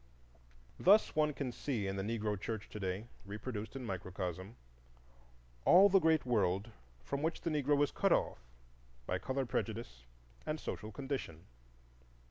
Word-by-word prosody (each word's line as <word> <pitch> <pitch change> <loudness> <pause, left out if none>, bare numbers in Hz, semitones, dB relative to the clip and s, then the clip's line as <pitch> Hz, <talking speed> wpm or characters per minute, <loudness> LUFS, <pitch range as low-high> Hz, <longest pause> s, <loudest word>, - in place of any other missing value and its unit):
Thus 205 +4 +5
one 150 -1 +3
can 135 -3 -3
see 120 -4 -2
in 95 0 -2
the 95 - -2
Negro 105 0 -1
church 110 +2 -5
to 105 - -7
day, 95 +2 -2 0.2
reproduced 105 +3 -5
in 130 -2 -5
microcosm, 95 +1 -4 1.1
all 195 - +8
the 195 0 +6
great 160 -4 +3
world 105 -2 +1 0.3
from 140 0 -3
which 160 +2 -1
the 165 - -1
Negro 145 -1 +3
is 145 - 0
cut - - +1
off - - +2 0.7
by 90 +6 -1
color 130 +7 -1
prejudice 110 - -3 0.4
and 155 +1 -3
social 110 -6 -5
condition. 130 - -5
115 Hz, 145 wpm, -35 LUFS, 95-145 Hz, 1.1 s, all